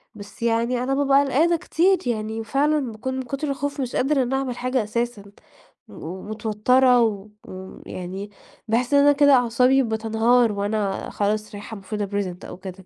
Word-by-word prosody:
بس 205 Hz, +2 st, -11 dB
يعني 235 Hz, +2 st, +1 dB
أنا 265 Hz, +2 st, -1 dB
بابقى 275 Hz, 0 st, +4 dB
قلقانة 320 Hz, +6 st, +2 dB
كتير، 370 Hz, +4 st, +2 dB
يعني 220 Hz, -1 st, -2 dB
فعلًا 280 Hz, +1 st, 0 dB
باكون 260 Hz, +4 st, -5 dB
من 260 Hz, -, -2 dB
كتر 275 Hz, +4 st, -4 dB
الخوف 285 Hz, +1 st, -3 dB
مش 250 Hz, -2 st, -4 dB
قادرة 270 Hz, 0 st, +2 dB
إن 250 Hz, +1 st, -3 dB
أعمل 270 Hz, -2 st, -2 dB
حاجة 255 Hz, -1 st, 0 dB
أساسًا، 235 Hz, 0 st, -3 dB, 0.7 s
ومتوترة 215 Hz, +7 st, +1 dB
و 215 Hz, -3 st, -1 dB, 0.2 s
ويعني 190 Hz, +1 st, -8 dB, 0.4 s
باحس 240 Hz, +4 st, 0 dB
إن 285 Hz, -, +6 dB
أنا 290 Hz, +1 st, +6 dB
كده 285 Hz, 0 st, +4 dB
أعصابي 250 Hz, +2 st, +3 dB
بتنهار 225 Hz, +1 st, +2 dB
وأنا 205 Hz, -1 st, -2 dB
خلاص 210 Hz, +1 st, -2 dB
رايحة 210 Hz, +2 st, -8 dB
المفروضة 205 Hz, +1 st, -4 dB
أpresent 195 Hz, -2 st, -4 dB
أو -, -, -9 dB
كده. 185 Hz, 0 st, -10 dB
235 Hz, 160 wpm, -23 LUFS, 210-265 Hz, 0.7 s, إن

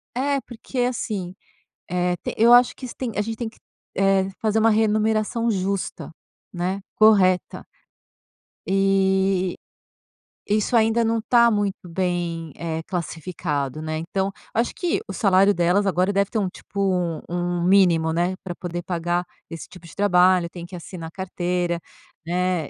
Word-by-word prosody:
É, 280 Hz, +2 st, +1 dB
porque 245 Hz, +2 st, -10 dB
é 245 Hz, -, +3 dB
assim, 200 Hz, -7 st, -3 dB, 0.6 s
eh 180 Hz, 0 st, +1 dB
te -, -, -5 dB
eu 235 Hz, +2 st, +6 dB
acho 245 Hz, 0 st, +6 dB
que 260 Hz, -, -10 dB
isso 245 Hz, -, -7 dB
tem 245 Hz, -4 st, -3 dB
a 205 Hz, -, +2 dB
gente 225 Hz, +1 st, -4 dB
tem 230 Hz, 0 st, -3 dB
que, 220 Hz, -, -17 dB, 0.4 s
eh, 195 Hz, 0 st, +3 dB
fazer 220 Hz, 0 st, +2 dB
uma 225 Hz, +1 st, +4 dB
renumeração 220 Hz, +1 st, +1 dB
justa, 195 Hz, -4 st, -3 dB, 0.4 s
né? 185 Hz, +2 st, -2 dB
Correta 195 Hz, -4 st, +3 dB, 1.0 s
e, 190 Hz, -1 st, +2 dB, 0.9 s
isso 215 Hz, +3 st, +1 dB
ainda 225 Hz, +1 st, +3 dB
não 225 Hz, 0 st, +1 dB
tá 235 Hz, 0 st, +5 dB
muito 200 Hz, -4 st, -2 dB
bem, 170 Hz, -2 st, -2 dB
eh, 165 Hz, -1 st, -4 dB
classificado, 160 Hz, -5 st, -3 dB
né, 155 Hz, 0 st, -3 dB
então, 190 Hz, +4 st, -2 dB, 0.2 s
acho 230 Hz, +2 st, 0 dB
que 355 Hz, +1 st, -1 dB
o -, -, -5 dB
salário 195 Hz, -2 st, +4 dB
delas 175 Hz, +3 st, +2 dB
agora 185 Hz, 0 st, +2 dB
deve 200 Hz, 0 st, +1 dB
ter 225 Hz, -, -1 dB
um, 195 Hz, -, 0 dB
tipo, 200 Hz, -, -9 dB
um 180 Hz, -4 st, 0 dB
um 175 Hz, 0 st, -1 dB
mínimo 175 Hz, -4 st, +4 dB
né, 175 Hz, +3 st, 0 dB
pra 180 Hz, -, -5 dB
poder 175 Hz, -1 st, -5 dB
pagar 175 Hz, 0 st, -1 dB, 0.3 s
esse 165 Hz, -2 st, -8 dB
tipo 180 Hz, -2 st, -14 dB
de -, -, -14 dB
trabalho, 180 Hz, -3 st, +4 dB
tem 175 Hz, -1 st, -8 dB
que 180 Hz, -, -10 dB
assinar 170 Hz, -1 st, -8 dB
carteira, 180 Hz, -2 st, -2 dB, 0.5 s
né 180 Hz, -2 st, -1 dB
190 Hz, 155 wpm, -23 LUFS, 175-215 Hz, 1.0 s, eu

